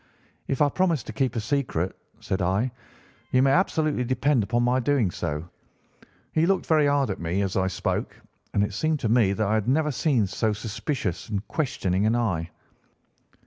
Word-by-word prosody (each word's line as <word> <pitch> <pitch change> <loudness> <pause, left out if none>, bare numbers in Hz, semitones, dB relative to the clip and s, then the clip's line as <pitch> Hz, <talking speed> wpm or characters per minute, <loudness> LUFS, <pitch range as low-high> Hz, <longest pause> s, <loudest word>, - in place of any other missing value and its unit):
"'If 135 +1 +2
I 145 - +3
promise 170 -5 +1
to 110 - -8
keep 130 +2 0
a - - 0
secret,' 110 - -1 0.3
said 95 0 -2
I, 95 +8 +1 0.6
'you 130 0 +3
may 135 - +4
absolutely 155 -5 +2
depend 130 +1 +2
upon 120 +4 0
my 125 +1 +2
doing 130 -7 +1
so.' 75 +1 -4 0.8
"He 160 +1 +2
looked 195 0 +1
very 155 -2 +3
hard 140 -5 +2
at - - -5
me 85 +4 -1
as 95 -1 -2
I 95 0 +2
spoke, 95 - -3 0.4
and 100 - +3
it 105 - -2
seemed 155 +7 0
to 115 - 0
me 110 -4 +4
that 110 +2 0
I 105 - +1
had 110 -1 0
never 150 +3 +2
seen 130 -6 +2
so 105 +3 0
suspicious 110 - -3
and 105 -1 -3
questioning 100 - 0
an 115 - +2
eye. 95 -9 -1
120 Hz, 185 wpm, -25 LUFS, 100-140 Hz, 0.8 s, may